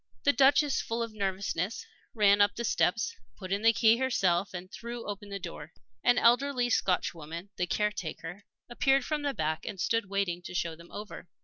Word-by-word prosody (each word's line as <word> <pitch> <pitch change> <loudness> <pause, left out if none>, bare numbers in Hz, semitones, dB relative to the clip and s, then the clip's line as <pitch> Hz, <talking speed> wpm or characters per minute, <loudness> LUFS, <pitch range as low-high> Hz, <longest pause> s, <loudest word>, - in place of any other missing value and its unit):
The - - +4
Duchess, 275 +3 +4
full 230 +1 -2
of 230 -1 -6
nervousness, 195 0 -2 0.3
ran 205 -2 +5
up 205 0 +4
the 235 - -3
steps, 215 -1 +1 0.2
put 185 0 -8
in 200 +1 0
the 225 +1 +6
key 225 0 +4
herself, 195 -8 +1
and 185 +1 -8
threw 235 0 -7
open 205 0 -6
the 200 - -4
door. 160 -4 -8 0.3
An 245 - +4
elderly 245 +1 +3
Scotchwoman, 170 -2 -1
the 180 - -1
caretaker, 195 -2 -3 0.2
appeared 270 +2 +2
from 305 -1 -1
the 285 -2 -2
back 155 +1 -1
and 195 - -6
stood 230 +1 0
waiting 195 -3 -1
to - - -7
show 170 -2 -1
them 170 +1 -16
over. 205 -3 -8
205 Hz, 185 wpm, -29 LUFS, 180-235 Hz, 0.3 s, the